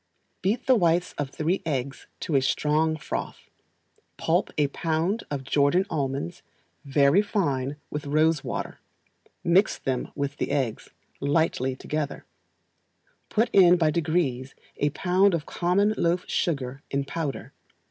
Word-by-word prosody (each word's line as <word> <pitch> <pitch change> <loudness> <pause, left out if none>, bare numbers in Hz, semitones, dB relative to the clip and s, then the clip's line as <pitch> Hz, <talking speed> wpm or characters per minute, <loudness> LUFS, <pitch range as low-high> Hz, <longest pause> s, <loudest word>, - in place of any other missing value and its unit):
Beat 220 +6 0
the 260 - +5
whites 175 -5 +2
of 145 -2 -1
three 160 +7 -1
eggs 135 -3 -3
to 160 - -1
a 135 - +5
strong 155 +4 +1
froth, - - -6 0.7
pulp - - +1
a 150 - +4
pound 165 +8 -1
of 140 -2 -3
Jordan 145 +7 +2
almonds 135 - -2 0.4
very 140 +5 +4
fine 145 -10 -1 0.2
with 150 -1 -4
rose 155 +1 +2
water, - - -4 0.6
mix 185 +5 +3
them, 130 -3 -3
with 140 0 -3
the - - -2
eggs, 135 -6 -2 0.3
lightly 140 -3 +1
together; 150 +2 -4 1.0
put 225 +2 +1
in 180 -2 +7
by 160 -3 +2
degrees 155 -6 -1 0.2
a 145 - +1
pound 185 +5 +2
of 155 - -4
common 195 +4 +1
loaf 175 +2 +1
sugar 140 -5 -1
in 140 0 -1
powder. 150 -1 -4
155 Hz, 135 wpm, -26 LUFS, 140-175 Hz, 1.0 s, in